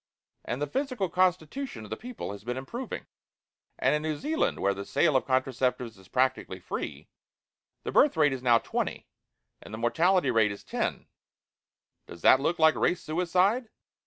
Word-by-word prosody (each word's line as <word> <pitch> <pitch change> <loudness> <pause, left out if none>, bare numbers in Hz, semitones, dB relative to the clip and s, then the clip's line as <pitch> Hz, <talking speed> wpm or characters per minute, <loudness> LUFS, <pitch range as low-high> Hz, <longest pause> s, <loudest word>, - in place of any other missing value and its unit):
And 120 - -4
the 145 - 0
physical 255 - -2
constitution 180 - 0
of 105 - -12
the - - -1
people 245 - -7
has 100 0 -9
been 125 +2 -3
improving. 235 - -6 0.7
And 135 - +2
in 150 - +1
New 155 -1 -2
Zealand, 315 - -1
where 100 0 +2
the 100 +1 -6
sale 155 +8 +2
of 130 - +2
contraceptives 130 -2 0
is 95 - -17
practically 130 +3 0
free, - - -6 0.8
the - - -3
birth 285 - +4
rate 150 -3 +4
is 130 - -5
now 120 -2 +5
20, - - -3 0.6
and - - -12
the 110 - -5
mortality 170 +11 +2
rate 110 -2 +3
is 100 - -8
10. - - -3 1.0
Does 85 - -12
that 130 - +7
look 165 +5 0
like 160 -1 +5
race 180 0 0
suicide? 180 +8 +1
150 Hz, 170 wpm, -28 LUFS, 120-185 Hz, 1.0 s, that